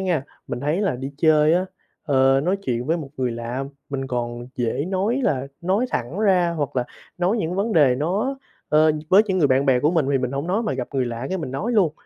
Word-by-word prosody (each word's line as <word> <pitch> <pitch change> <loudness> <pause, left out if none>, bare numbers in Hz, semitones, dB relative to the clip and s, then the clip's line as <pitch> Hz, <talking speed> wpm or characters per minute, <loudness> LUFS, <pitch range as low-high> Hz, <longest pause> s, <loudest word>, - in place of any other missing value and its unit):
nha, 175 -7 0 0.2
mình 120 - -4
thấy 150 +7 0
là 195 -11 0
đi 135 +2 -5
chơi 155 0 +4
á, 185 +2 +1 0.4
ờ, 135 -2 +3
nói 185 +3 +1
chuyện 125 -11 -3
với 165 +3 +1
một 155 -5 -6
người 130 -2 0
lạ 120 +3 -4 0.2
mình 135 -2 -3
còn 120 -1 -4
dễ 120 +3 -1
nói 195 +8 0
là 135 - 0
nói 195 +8 +1
thẳng 125 +10 -3
ra 185 -5 +3
hoặc 145 -3 -3
là 125 - +1 0.3
nói 180 +5 +1
những 175 -5 -2
vấn 205 +4 0
đề 145 -8 +5
nó, 195 - -1 0.3
ờ, 155 +1 +4 0.2
với 195 +4 +7
những 190 -2 0
người 155 - +4
bạn 135 +1 +2
bè 130 -2 +4
của 150 - +3
mình 165 -5 +1
thì 135 - +3
mình 125 0 -2
hổng 140 +3 -3
nói 195 +6 0
mà 215 - -1
gặp 130 -2 -4
người 130 -2 +1
lạ 120 +2 -4
cái 190 - -2
mình 160 - -5
nói 190 - -2
luôn, 190 -9 +3
150 Hz, 245 wpm, -22 LUFS, 130-185 Hz, 0.4 s, với